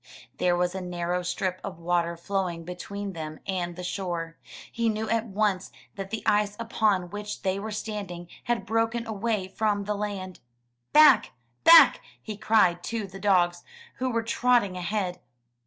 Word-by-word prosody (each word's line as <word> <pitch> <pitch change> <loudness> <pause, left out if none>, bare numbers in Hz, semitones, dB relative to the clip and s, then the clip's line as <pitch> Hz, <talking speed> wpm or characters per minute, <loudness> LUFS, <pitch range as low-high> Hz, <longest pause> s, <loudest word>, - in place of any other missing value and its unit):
There 175 -1 +3
was 180 0 0
a 190 - -4
narrow 180 0 -2
strip 185 +1 -2
of 185 - -6
water 170 0 0
flowing 180 -1 -2
between 195 +3 -6
them 155 -2 -6
and 175 -2 -2
the 180 - -7
shore. 175 -3 -3 0.4
He 230 -1 0
knew 220 0 -2
at 230 0 +1
once 200 -2 0 0.2
that 195 -1 -6
the 220 - -4
ice 205 0 +2
upon 210 -6 0
which 205 0 -6
they 190 +1 0
were 215 +2 -5
standing 205 -5 -5 0.2
had 240 -1 -1
broken 225 +1 0
away 215 -2 -2
from 205 +1 0
land. 200 -2 -4 0.5
"Back! 300 -7 +6 0.3
Back!'' 325 -4 +8 0.2
he 215 - -7
cried 210 -5 +3
to 230 -2 -3
the 195 0 -10
dogs, 175 -4 +2 0.3
who 255 0 -1
were 230 -2 0
trotting 235 -4 +2
ahead. 180 0 -2
195 Hz, 155 wpm, -27 LUFS, 180-220 Hz, 0.5 s, Back